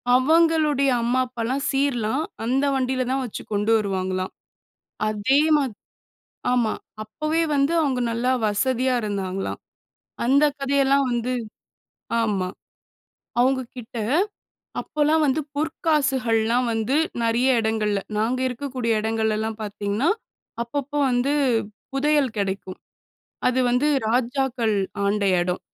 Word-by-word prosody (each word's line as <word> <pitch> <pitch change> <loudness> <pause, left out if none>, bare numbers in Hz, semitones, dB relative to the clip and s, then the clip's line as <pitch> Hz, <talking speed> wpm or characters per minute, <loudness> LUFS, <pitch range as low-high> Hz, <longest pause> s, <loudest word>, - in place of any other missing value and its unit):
அவங்களுடைய 305 -1 +3
அம்மா, 245 +2 +1
அப்பாலாம் 250 +3 -2
சீர்லாம் 270 -2 0 0.2
அந்த 265 +4 +1
வண்டியில 255 -1 0
தான் 270 0 0
வச்சுக் 220 - -8
கொண்டு 205 +2 +1
வருவாங்களாம். 185 -2 -2 0.8
அதே 215 +6 +2 0.2
மாதி 260 -7 -1 0.8
ஆமா. 235 -3 +2 0.3
அப்போவே 305 +9 -1
வந்து 280 +3 +2
அவங்க 260 -4 0
நல்லா 240 +2 0 0.2
வசதியா 255 +4 +1
இருந்தாங்களாம். 195 -2 -3 0.7
அந்த 280 +4 +5 0.2
கதையெல்லாம் 275 0 +3
வந்து 240 +1 -1 0.9
ஆமா. 195 -5 0 0.9
அவங்க 260 +1 +3 0.2
கிட்ட 235 0 -8 0.8
அப்போலாம் 305 +1 +1
வந்து 280 +3 +1
பொற்காசுகள்லாம் 260 -7 +1
வந்து 225 +5 0 0.3
நெறைய 240 +2 +3
இடங்கள்ல, 215 -2 0 0.2
நாங்க 245 +4 0
இருக்கக்கூடிய 250 -4 -1
இடங்கள்ல 220 -1 0
எல்லாம் 220 0 -3
பாத்தீங்கன்னா, 205 - -1 0.5
அப்பப்போ 285 +4 -3
வந்து 250 +4 +1 0.6
புதையல் 280 -4 +2
கிடைக்கும். 190 -1 -3 0.7
அது 255 +1 0
வந்து 255 +5 +2 0.2
ராஜாக்கள் 245 -2 0 0.3
ஆண்ட 200 0 +1 0.2
இடம். 180 +1 -1
250 Hz, 105 wpm, -23 LUFS, 220-275 Hz, 0.9 s, அந்த